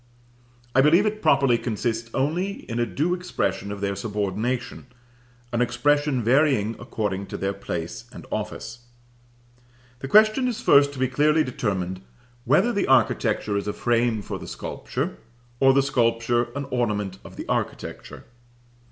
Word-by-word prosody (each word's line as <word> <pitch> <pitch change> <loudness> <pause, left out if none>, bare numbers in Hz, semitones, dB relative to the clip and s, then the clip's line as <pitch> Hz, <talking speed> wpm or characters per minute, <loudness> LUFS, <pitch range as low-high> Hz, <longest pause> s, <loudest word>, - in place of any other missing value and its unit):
I 130 - +5
believe 165 +8 +5
it 215 0 -1
properly 140 -6 +4
consists 115 0 -2
only 175 +9 -1
in 115 0 -4
a 120 - +1
due 165 +5 0
expression 100 - -2
of 100 -1 -6
their 100 -1 -1
subordination, 105 +4 -3 0.7
an 120 - +1
expression 145 +2 +1
varying 120 -3 +3
according 105 -5 -3
to - - -6
their 100 +1 -1
place 85 -4 -5
and - - -11
office. 120 +1 -5 1.1
The 135 - -5
question 215 - +5
is 240 -3 -2
first 140 0 +5
to - - -10
be 130 - +2
clearly 150 +5 +3
determined 95 -8 -3 0.4
whether 150 - +3
the 200 - 0
architecture 110 -5 +2
is 100 - -3
a 105 - -1
frame 120 -2 +1
for - - -5
the - - -9
sculpture, - - -4 0.4
or 135 0 +6
the 135 +1 +3
sculpture 120 -3 +1
an 140 0 -3
ornament 105 -6 -1
of - - -12
the - - -7
architecture. - - -4
120 Hz, 150 wpm, -24 LUFS, 105-145 Hz, 1.1 s, or